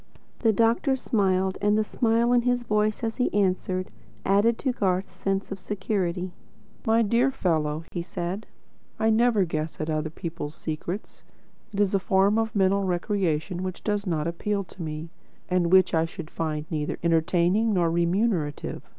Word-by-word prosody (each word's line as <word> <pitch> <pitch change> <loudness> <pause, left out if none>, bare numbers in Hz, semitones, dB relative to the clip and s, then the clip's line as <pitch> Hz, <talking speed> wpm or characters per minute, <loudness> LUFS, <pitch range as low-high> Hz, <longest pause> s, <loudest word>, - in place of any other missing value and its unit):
The 225 - +4
doctor 230 +6 +2
smiled; 190 -6 +1
and 210 +1 +3
the 215 - +3
smile 230 +2 +2
in 245 - +5
his 245 0 +1
voice 210 0 0
as 225 0 -2
he 250 - +1
answered, 185 -2 0 0.3
added 205 +4 +3
to 265 - 0
Garth's 190 -5 0
sense 195 +2 -2
of 195 - -4
security. 185 -3 -2 0.6
"My 225 +1 +4
dear 235 +5 +3
fellow," 160 - 0
he 175 - -3
said, 175 +3 -4 0.5
"I 220 0 +2
never 225 -3 +3
guess 155 -1 -4
at 155 +1 -2
other 155 0 -1
people's 160 -2 -6
secrets. 170 +5 -5 0.5
It 200 - -4
is 205 -1 +2
a 195 - +3
form 195 +3 +3
of 225 -1 -2
mental 195 0 +3
recreation 180 -2 -1
which 185 -1 -5
does 205 -1 -1
not 155 -4 0
appeal 200 +4 -1
to 185 - -13
me, 155 0 -5 0.4
and 180 -2 +1
which 190 0 +5
I 160 0 +3
should 165 -1 -8
find 155 -2 -2
neither 150 -2 -2
entertaining 175 +6 +2
nor 175 -4 +2
remunerative. 170 -2 0
190 Hz, 165 wpm, -26 LUFS, 170-215 Hz, 0.6 s, in